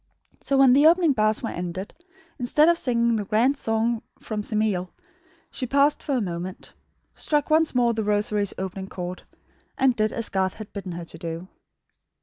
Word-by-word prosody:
So; 275 - 0
when 265 -2 +6
the 285 +4 +6
opening 335 -2 +4
bars 215 -1 +1
were 225 - -2
ended, 180 +2 -5 0.5
instead 275 +5 +3
of 340 0 +4
singing 235 -2 +1
the 210 - -2
grand 230 +7 +2
song 225 -2 -1 0.2
from 215 -1 -4
Semele 210 -4 -1 0.6
she 255 - -4
paused 280 +3 +3
for 280 - -2
a 250 - +1
moment; 180 -1 -6 0.4
struck 295 0 -1
once 315 -2 +3
more 240 -1 +3
The 220 -1 -2
Rosary's; 205 -1 0
opening 190 0 -5
chord; 180 0 -6 0.6
and 260 -2 +3
did 215 -1 +1
as 230 -2 -1
Garth 190 -1 0
had 215 -2 -10
bidden 195 -3 -6
her 170 0 -6
to - - -9
do. 170 +1 -6
220 Hz, 175 wpm, -24 LUFS, 190-260 Hz, 0.6 s, when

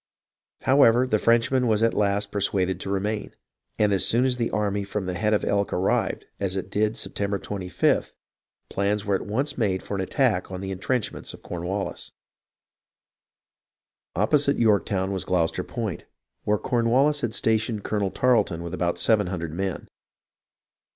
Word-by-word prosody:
However, 130 -2 +5
the 110 -4 +1
Frenchman 120 +3 +3
was 110 -1 +2
at 115 - +3
last 100 0 0
persuaded 95 -2 0
to 95 - -5
remain, 105 +2 -2 0.4
and 105 -1 +3
as 95 - +2
soon 120 +3 +3
as 125 -1 +1
the 115 -2 0
army 100 -1 -1
from 100 0 -3
the 90 - -2
Head 105 +4 0
of 105 - +1
Elk 100 0 0
arrived, 95 +2 0
as 95 -1 -1
it 95 - -4
did 110 +2 +1
Sep - - -3
tember 100 0 -1
25th, 95 -2 -1 0.5
plans 100 +1 -1
were 100 - 0
at 95 - -1
once 135 +7 -2
made 95 -5 0
for - - -6
an 100 - -1
attack 105 0 +1
on 95 - -5
the 95 0 -5
intrenchments 105 +5 -2
of - - -19
Cornwallis. 90 +3 -4 2.0
Opposite 140 - +2
Yorktovvn 100 -3 +2
was 95 -2 -2
Gloucester 90 0 0
Point, 110 -8 -5 0.4
where 105 0 +2
Corn 115 +1 0
wallis 145 +4 +3
had 120 -3 -2
stationed 110 -1 +1
Colonel 105 -2 -1
Tarleton 105 -8 +1
with 85 +1 -6
about 90 -1 -1
seven 105 -4 +3
hundred 85 -4 -4
men. 95 +1 -3
105 Hz, 165 wpm, -25 LUFS, 95-115 Hz, 2.0 s, However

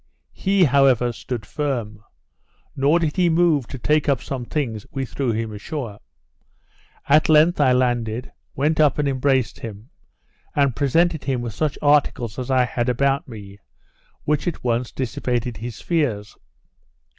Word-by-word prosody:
He 195 -1 +2
however 130 -4 +4
stood 115 -1 -6
firm; 115 -7 -3 0.7
nor 140 +5 +3
did 165 -2 -1
he 180 -2 +3
move 160 -6 +2
to 135 - -7
take 150 +4 +1
up 135 -3 +2
some 130 -1 -5
things 115 -7 -3
we 135 -1 -3
threw 130 +1 -2
him 110 0 -3
ashore. 110 0 -6 1.1
At 150 +3 +4
length 155 +1 +5
I 130 -3 +4
landed, 120 -2 0 0.2
went 150 +3 0
up 150 -2 +4
and 145 -1 0
embraced 130 -2 0
him; 110 +4 -9 0.6
and 140 -5 +2
presented 160 +3 +1
him 130 -3 -1
with 120 -2 -5
such 150 +4 -1
articles 140 -6 +2
as 125 +1 -5
I 130 -1 +3
had 120 0 -2
about 135 +3 +1
me, 100 -4 -11 0.6
which 150 0 0
at 175 - -3
once 120 0 -1
dissipated 125 -2 -3
his 115 0 -7
fears. 125 -12 -1
130 Hz, 150 wpm, -22 LUFS, 120-150 Hz, 1.1 s, length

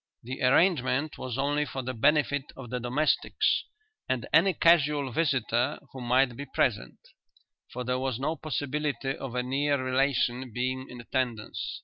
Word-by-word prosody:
The 125 +3 -6
arrangement 145 0 +2
was 125 -1 -4
only 145 +2 +1
for 135 -2 -5
the 130 +1 -3
benefit 145 +3 +2
of 125 -3 -9
the 125 - -2
domestics 130 +6 +1 0.4
and 130 -2 -1
any 170 +5 +6
casual 150 -5 +3
visitor 130 -3 +1 0.2
who 130 - -7
might 125 +1 +2
be 140 +3 -7
present, 100 - 0 0.7
for 125 - -4
there 125 +1 -1
was 130 -3 -1
no 155 +4 -1
possibility 145 -3 -2
of 130 -3 -7
a 125 - 0
near 140 +3 +1
relation 130 -1 0
being 130 +3 -2
in 125 - -9
attendance. 120 -3 -3
130 Hz, 150 wpm, -28 LUFS, 125-145 Hz, 0.7 s, any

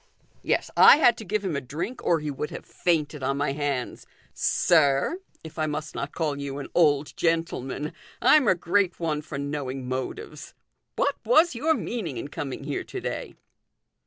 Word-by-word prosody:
" - - -38
Yes, - - 0
I - - +9
had 245 -6 +5
to - - -7
give 210 +1 -2
him 175 -5 -1
a 140 - -1
drink, 170 - -5
or 170 -2 +3
he 150 -1 -3
would 145 +2 -4
have - - -8
fainted 155 -4 -1
on 135 +1 -1
my 145 0 0
hands. 140 -3 -3 0.3
Sir 155 - +2 0.2
if 160 0 -9
I 155 - +1
must 155 +1 -4
not 140 - -4
call 150 -4 -2
you 140 -1 -4
an 145 - -6
old 150 -4 +3
gentleman 165 -4 -1 0.3
I'm 270 0 +5
a 185 - +5
great 180 +1 +1
one 155 -3 -1
for 150 -1 -7
knowing 140 -2 -4
motives. 130 - -5 0.4
What - - +1
was 345 - +4
your 305 +7 +1
meaning 190 - -4
in 140 - -5
coming 135 -2 -5
here - - -3
to - - -6
day - - -5
155 Hz, 185 wpm, -26 LUFS, 140-180 Hz, 0.4 s, I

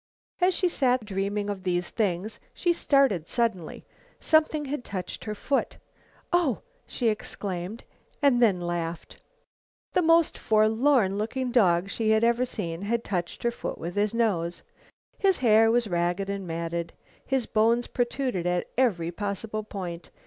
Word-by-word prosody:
As 360 0 +3
she 370 - +2
sat 255 -8 +1
dreaming 200 +1 -2
of 200 -2 -4
these 175 -1 -1
things, 205 -1 -1 0.2
she 350 -1 +2
started 270 - +2
suddenly. 225 -9 -2 0.3
Something 315 -1 +2
had 275 -2 -4
touched 185 -5 -6
her 215 -1 -3
foot. 275 +6 -1 0.6
"Oh;" 335 -9 +2 0.2
she 240 -3 0
exclaimed, 200 -1 -4 0.4
then 240 - +4
laughed. 175 -1 -4 0.7
The - - +3
most 330 -1 +3
forlorn 220 -1 +3
looking 250 +4 -2
dog 185 -7 +3
she 225 -2 0
had 220 +1 +3
ever 235 +2 +3
seen 165 -7 -4
had 230 +3 -1
touched 175 -3 -3
her 235 - +2
foot - - -5
with 170 +2 -5
his 205 +1 +1
nose. 190 -8 0 0.6
His 385 -2 +3
hair 225 -2 +5
was 235 0 +2
ragged 175 +2 -1
and 195 -2 -5
matted. 170 0 -3 0.3
His 265 -3 0
bones 230 +2 +2
protruded 245 -7 -1
at 180 0 -1
every 175 -10 +1
possible 205 +3 -3
point. 180 -5 -7
215 Hz, 145 wpm, -27 LUFS, 180-245 Hz, 0.7 s, hair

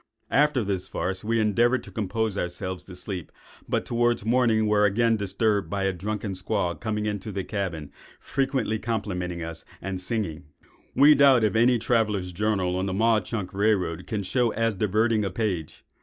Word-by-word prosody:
After 145 -3 +3
this 95 -2 -2
farce, 95 +2 -3
we 115 +1 +1
endeavoured 120 +4 +2
to - - -12
compose 110 0 -2
ourselves 90 0 -4
to 90 - -10
sleep, 90 -2 -6 0.4
but - - 0
towards 120 -2 +1
morning 115 -2 +3
were 105 -1 +3
again 115 +3 +3
disturbed 105 0 0
by 100 -1 -2
a 95 0 +1
drunken 105 +3 -4
squaw 95 -1 -1
coming 105 +1 -2
into 105 0 -3
the 95 -1 -3
cabin, 85 -9 -4 0.3
frequently 135 -5 -1
complimenting 90 -7 -3
us 80 0 -7 0.2
and 95 0 -4
singing." 90 -6 -3 0.5
We 145 +3 +8
doubt 135 -5 +5
if 110 0 +1
any 120 +2 +4
traveller's 105 -5 0
journal 95 -1 0
on 95 +1 -1
the 95 - -2
Mauch 110 0 +2
Chunk 100 -5 -4
rail 105 +2 +3
road 85 -3 -5
can 105 -3 -2
show 120 +6 +1
as 115 -1 +1
diverting 110 +3 +1
a 100 - -1
page. 90 -5 -3
105 Hz, 175 wpm, -26 LUFS, 95-115 Hz, 0.5 s, We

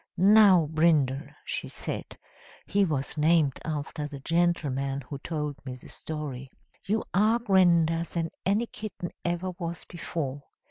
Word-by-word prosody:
"'Now, 195 -2 +7
Brindle,' 155 -4 +2 0.2
she - - -3
said - - -6 0.5
(he 200 0 +2
was 150 -2 -2
named 155 -3 +3
after 150 -1 -3
the 145 -2 -8
gentleman 140 -4 0
who 140 +2 -7
told 150 -2 -4
me 130 -2 -6
the 125 - -13
story), 140 -4 -5 0.4
'you 215 +3 +1
are 215 +5 +4
grander 175 -7 +3
than 165 -1 -3
any 205 +5 +2
kitten 210 -6 -7
ever 175 +2 -1
was 170 -1 -5
before.' 150 -5 -4
165 Hz, 135 wpm, -28 LUFS, 145-180 Hz, 0.5 s, Now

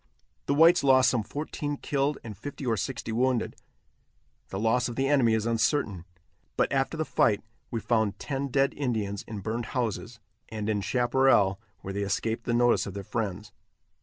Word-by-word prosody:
The 140 - +2
whites 165 +3 +6
lost 130 -2 +5
some 120 - +1
fourteen 145 +5 -4
killed 140 +1 -1
and 110 -3 -7
fifty 140 +6 -7
or 115 -2 +2
sixty 120 +2 -4
wounded. 125 +1 0 0.9
The 95 - -4
loss 115 +3 +2
of 120 - -6
the 135 +2 +1
enemy 130 -6 +4
is 110 -1 -1
uncertain, 115 - 0 0.5
but - - +1
after 135 +4 0
the 155 - -1
fight 105 -7 +2 0.3
we 115 - -2
found 110 -3 +1
ten 140 0 -3
dead 135 +1 +2
Indians 110 -8 -2
in 105 -3 -6
burned 110 +3 -3
houses, 115 0 -2 0.3
and 110 -1 -4
in 105 -2 0
chaparral 120 -4 +3 0.2
where 95 - -6
they 100 - -2
escaped 110 +3 -2
the - - -1
notice 120 -2 +3
of 100 - -7
their 100 - -5
friends. 105 -1 -4
120 Hz, 175 wpm, -28 LUFS, 105-135 Hz, 0.9 s, whites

